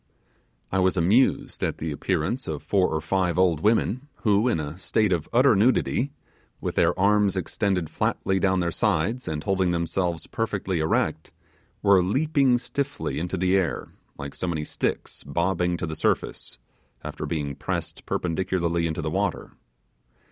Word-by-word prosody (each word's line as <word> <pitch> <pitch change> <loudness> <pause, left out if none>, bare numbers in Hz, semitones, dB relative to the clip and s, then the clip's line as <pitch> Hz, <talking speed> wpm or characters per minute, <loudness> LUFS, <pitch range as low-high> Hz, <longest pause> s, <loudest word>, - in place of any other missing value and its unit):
I 95 - +1
was 95 0 +2
amused 100 +10 +2
at - - -1
the 80 0 -3
appearance 70 - -1
of - - -4
four 95 -2 +2
or 80 0 -2
five 90 +1 0
old 90 -4 +3
women 115 - +1 0.2
who, 105 +1 +3
in 120 - +1
a 75 +3 -5
state 105 0 +1
of 80 -3 -2
utter 125 0 +5
nudity, 125 +5 +2 0.5
with - - -3
their - - +2
arms 100 0 +3
extended 95 -1 -1
flatly 95 +4 0
down 95 -1 +2
their 85 -1 0
sides, 105 +5 0
and 75 -1 -3
holding 95 -2 +1
themselves 85 0 -1
perfectly 100 -5 -2
erect, 80 - 0 0.5
were 100 -2 +6
leaping 135 - +2
stiffly 125 - -3
into 90 +3 -3
the 90 +1 +2
air, 90 -8 0 0.3
like 70 0 -6
so 90 - -4
many 80 -3 -1
sticks - - -3
bobbing 85 +3 0
to 85 - -3
the 80 -1 -5
surface, - - -1 0.5
after - - -5
being 75 -4 -2
pressed 70 - -4
perpendicularly 85 -1 0
into 80 0 -3
the 80 - -2
water. 95 +1 -1
95 Hz, 155 wpm, -25 LUFS, 85-105 Hz, 0.5 s, were